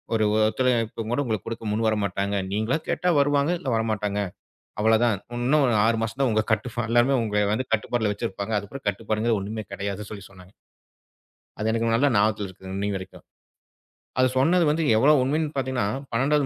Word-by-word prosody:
ஒரு 110 Hz, -, +2 dB, 0.2 s
ஒத்துழைப்பு 115 Hz, -1 st, 0 dB
கூட 130 Hz, +4 st, +1 dB
உங்களுக்கு 110 Hz, -5 st, -3 dB
கொடுக்க 115 Hz, -1 st, -5 dB
முன்வரமாட்டாங்க. 100 Hz, -2 st, 0 dB, 0.2 s
நீங்களா 110 Hz, +9 st, 0 dB
கேட்டா 180 Hz, -, +1 dB
வருவாங்க. 145 Hz, +2 st, +2 dB
இல்ல 130 Hz, -, -3 dB
வரமாட்டாங்க. 105 Hz, -2 st, -1 dB, 0.6 s
அவ்வளவுதான். 110 Hz, -1 st, +3 dB, 0.2 s
இன்னும் 135 Hz, +5 st, +3 dB
ஒரு 120 Hz, -, +2 dB
6 115 Hz, 0 st, +2 dB
மாசம் 115 Hz, +4 st, -4 dB
தான் 130 Hz, -, +3 dB
உங்க 110 Hz, 0 st, +2 dB
கட்டுப்பாடு. 115 Hz, +2 st, -2 dB
எல்லாரும் 120 Hz, +2 st, +3 dB
உங்களை 105 Hz, +2 st, 0 dB
கட்டுப்பாடுல 110 Hz, -1 st, 0 dB
வச்சிருப்பாங்க. 100 Hz, +2 st, -4 dB
அதுக்கு 105 Hz, +6 st, -9 dB
கட்டுப்பாடுங்கறது 110 Hz, +2 st, -1 dB
ஒண்ணுமே 110 Hz, +2 st, -4 dB
கிடையாது 100 Hz, +1 st, -4 dB
சொல்லி 100 Hz, -1 st, -8 dB
சொன்னாங்க. 95 Hz, 0 st, -16 dB, 1.1 s
அது 110 Hz, -, 0 dB
எனக்கு 115 Hz, 0 st, 0 dB
நல்லா 140 Hz, +4 st, +3 dB
ஞாபகத்துல 105 Hz, 0 st, +2 dB
இருக்கு. 95 Hz, 0 st, -11 dB
இன்னி 100 Hz, +1 st, -1 dB
வரைக்கும் 95 Hz, 0 st, -11 dB, 0.9 s
அது 130 Hz, -, +5 dB
சொன்னது 170 Hz, +6 st, +4 dB
வந்து 160 Hz, +2 st, +1 dB
எவ்வளவு 145 Hz, +5 st, +5 dB
உண்மைன்னு 150 Hz, +3 st, -1 dB
பாத்தீங்கன்னா, 130 Hz, -5 st, 0 dB, 0.2 s
12வது 140 Hz, +4 st, +2 dB
115 Hz, 155 wpm, -25 LUFS, 105-130 Hz, 1.1 s, அது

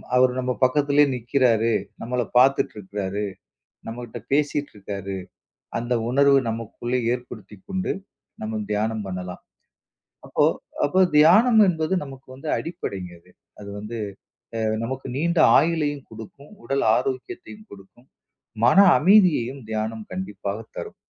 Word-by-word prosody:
அவர் 125 Hz, 0 st, +5 dB
நம்ம 125 Hz, 0 st, -1 dB
பக்கத்துலயே 145 Hz, +2 st, +4 dB
நிக்கிறாரு, 120 Hz, -2 st, +2 dB, 0.3 s
நம்மள 125 Hz, +1 st, -1 dB, 0.2 s
பாத்துட்டு 135 Hz, +2 st, +3 dB
இருக்காரு, 100 Hz, 0 st, -4 dB, 0.7 s
நம்மகிட்ட 120 Hz, 0 st, -7 dB
பேசிட்டு 145 Hz, 0 st, 0 dB
இருக்காரு, 100 Hz, -1 st, -6 dB, 0.6 s
அந்த 120 Hz, +1 st, -1 dB, 0.2 s
உணர்வு 140 Hz, +1 st, +5 dB
நமக்குள்ளே 115 Hz, +2 st, -3 dB, 0.2 s
ஏற்படுத்திக்கொண்டு, 120 Hz, -, -6 dB, 0.5 s
நம்ம 110 Hz, 0 st, -3 dB
தியானம் 110 Hz, +1 st, -1 dB
பண்ணலாம். 90 Hz, -1 st, -6 dB, 0.8 s
அப்போ -, -, +1 dB, 0.4 s
அப்போ 185 Hz, +6 st, +2 dB, 0.2 s
தியானம் 215 Hz, +10 st, +6 dB
என்பது 165 Hz, 0 st, 0 dB
நமக்கு 135 Hz, -2 st, -12 dB
வந்து 135 Hz, +4 st, -8 dB
அடிப்படைங்க 100 Hz, -, -5 dB
இது. -, -, -24 dB, 0.3 s
அது 100 Hz, -, -9 dB
வந்து 105 Hz, +3 st, -6 dB, 0.6 s
அ -, -, -2 dB, 0.2 s
நமக்கு 130 Hz, +3 st, -5 dB
நீண்ட 170 Hz, +3 st, +1 dB, 0.2 s
ஆயுளையும் 150 Hz, -2 st, 0 dB
கொடுக்கும், 115 Hz, +6 st, -12 dB
உடல் 135 Hz, 0 st, 0 dB
ஆரோக்கியத்தையும் 370 Hz, -, -5 dB
கொடுக்கும், 100 Hz, +6 st, -16 dB, 0.6 s
மன 125 Hz, -, +5 dB, 0.2 s
அமைதியையும் 150 Hz, -, +4 dB
தியானம் 110 Hz, 0 st, -3 dB
கண்டிப்பாகத் 100 Hz, +3 st, -5 dB
தரும். -, -, -6 dB
125 Hz, 115 wpm, -23 LUFS, 110-145 Hz, 0.8 s, தியானம்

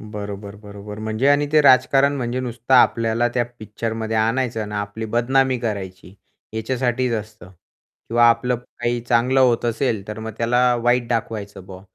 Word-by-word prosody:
बरोबर, 100 Hz, -1 st, -7 dB
बरोबर. 105 Hz, 0 st, -10 dB
म्हणजे 110 Hz, +4 st, -1 dB
आणि 145 Hz, +1 st, +3 dB
ते 155 Hz, -, +6 dB
राजकारण 135 Hz, +1 st, +4 dB
म्हणजे 125 Hz, -1 st, -2 dB
नुसतं 120 Hz, +1 st, -1 dB
आपल्याला 115 Hz, -1 st, +3 dB
त्या 120 Hz, -, +1 dB
पिक्चरमध्ये 110 Hz, +1 st, -4 dB
आणायचं 115 Hz, -1 st, 0 dB
ना, 105 Hz, 0 st, -3 dB
आपली 105 Hz, +2 st, -6 dB
बदनामी 130 Hz, +3 st, +1 dB
करायची, 100 Hz, -6 st, -5 dB, 0.4 s
ह्याच्यासाठीच 125 Hz, +2 st, -1 dB
असतं. 105 Hz, -3 st, -7 dB, 0.6 s
किंवा 120 Hz, +1 st, +3 dB
आपलं 115 Hz, +2 st, +2 dB
काही 120 Hz, 0 st, -4 dB
चांगलं 125 Hz, +3 st, +3 dB
होत 120 Hz, -3 st, +3 dB
असेल, 115 Hz, -3 st, -1 dB
तर 105 Hz, 0 st, -6 dB
मग 110 Hz, 0 st, -5 dB
त्याला 120 Hz, +1 st, +2 dB
वाईट 120 Hz, 0 st, +2 dB
दाखवायचं 110 Hz, -4 st, -4 dB
बॉ, 95 Hz, -1 st, -10 dB
115 Hz, 150 wpm, -21 LUFS, 110-125 Hz, 0.6 s, ते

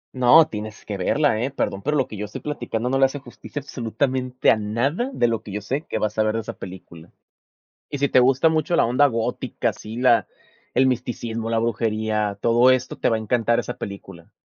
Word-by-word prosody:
No, 130 Hz, +6 st, +6 dB
tienes 105 Hz, -4 st, -7 dB
que 105 Hz, -, -4 dB
verla, 110 Hz, +5 st, +1 dB
¿eh? 125 Hz, -, 0 dB
Perdón, 100 Hz, -7 st, -3 dB
pero 150 Hz, +5 st, 0 dB
lo 135 Hz, -, +1 dB
que 105 Hz, -, -8 dB
yo 105 Hz, -, -4 dB
estoy 105 Hz, -, -8 dB
platicando 120 Hz, -5 st, -3 dB
no 135 Hz, +1 st, +1 dB
le 135 Hz, -, +6 dB
hace 135 Hz, +2 st, -2 dB
justicia 145 Hz, +1 st, -8 dB
absolutamente 130 Hz, 0 st, 0 dB
a -, -, +3 dB
nada 120 Hz, -, -1 dB
de 120 Hz, -, +1 dB
lo 115 Hz, -1 st, -1 dB
que 105 Hz, -, -10 dB
yo 105 Hz, -, -3 dB
sé 130 Hz, +10 st, -4 dB
que -, -, -1 dB
vas 110 Hz, 0 st, -2 dB
a -, -, +5 dB
ver 110 Hz, 0 st, 0 dB
de 115 Hz, -, -1 dB
esa 110 Hz, -, -7 dB
película. 90 Hz, -3 st, -11 dB, 0.8 s
Y 145 Hz, -, -5 dB
si 140 Hz, 0 st, +1 dB
te -, -, +5 dB
gusta 135 Hz, +5 st, +4 dB
mucho 160 Hz, +2 st, 0 dB
la -, -, +4 dB
onda 125 Hz, +5 st, +3 dB
gótica, 115 Hz, -4 st, -1 dB
así, 110 Hz, +2 st, -8 dB
la 125 Hz, -2 st, +3 dB, 0.5 s
el 130 Hz, +1 st, +4 dB
misticismo, 115 Hz, -2 st, -3 dB
la 115 Hz, -, +2 dB
brujería, 110 Hz, -2 st, -1 dB
todo 120 Hz, +2 st, +5 dB
esto 130 Hz, 0 st, -1 dB
te -, -, +1 dB
va 115 Hz, -, +1 dB
a -, -, -4 dB
encantar 115 Hz, +1 st, +1 dB
esa 125 Hz, -, -4 dB
película. 95 Hz, -3 st, -9 dB
115 Hz, 220 wpm, -23 LUFS, 110-130 Hz, 0.8 s, No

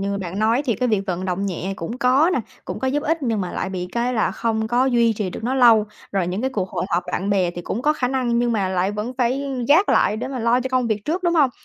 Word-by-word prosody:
như 200 Hz, 0 st, -2 dB
bạn 185 Hz, 0 st, -5 dB
nói 225 Hz, +6 st, +2 dB
thì 235 Hz, -5 st, +1 dB
cái 250 Hz, +5 st, -1 dB
việc 215 Hz, -3 st, +2 dB
vận 185 Hz, 0 st, -2 dB
động 190 Hz, +2 st, -2 dB
nhẹ 190 Hz, +1 st, -3 dB
cũng 225 Hz, +10 st, -5 dB
có 275 Hz, +7 st, +4 dB
nè, -, -, +1 dB, 0.2 s
cũng -, -, -5 dB
có 265 Hz, -, -2 dB
giúp 290 Hz, +3 st, 0 dB
ích 320 Hz, 0 st, -1 dB
nhưng 225 Hz, -4 st, 0 dB
mà 180 Hz, -, -4 dB
lại 190 Hz, -, -3 dB
bị 180 Hz, -1 st, -4 dB
cái 240 Hz, +1 st, 0 dB
là 220 Hz, -, +1 dB
không 220 Hz, -1 st, -1 dB
có 245 Hz, +2 st, +2 dB
duy 235 Hz, -3 st, +3 dB
trì 205 Hz, -3 st, -3 dB
được 220 Hz, -, -7 dB
nó 255 Hz, +3 st, 0 dB
lâu. 235 Hz, -5 st, +6 dB, 0.3 s
Rồi 190 Hz, -3 st, 0 dB
những 180 Hz, +3 st, -2 dB
cái 265 Hz, +2 st, -1 dB
cuộc 195 Hz, -7 st, -2 dB
hội -, -, -2 dB
họp 175 Hz, -1 st, +1 dB
bạn 195 Hz, +2 st, -1 dB
bè 185 Hz, -3 st, +2 dB
thì 175 Hz, 0 st, -7 dB
cũng 230 Hz, -, -4 dB
có 300 Hz, +2 st, +3 dB
khả 255 Hz, -5 st, -1 dB
năng 250 Hz, -3 st, 0 dB
nhưng 240 Hz, 0 st, +1 dB
mà 200 Hz, -4 st, 0 dB
lại 185 Hz, +1 st, 0 dB
vẫn 210 Hz, +4 st, -4 dB
phải 255 Hz, +3 st, +1 dB, 0.2 s
gác 340 Hz, +8 st, +5 dB
lại 210 Hz, -, +3 dB
để 245 Hz, +3 st, -4 dB
mà 265 Hz, -1 st, -4 dB
lo 235 Hz, +2 st, +2 dB
cho 260 Hz, -, -3 dB
công 255 Hz, -2 st, +1 dB
việc 210 Hz, -2 st, -2 dB
trước, 350 Hz, +4 st, -2 dB
đúng 345 Hz, -1 st, +1 dB
hông? 290 Hz, -6 st, +4 dB
230 Hz, 300 wpm, -22 LUFS, 195-255 Hz, 0.3 s, lâu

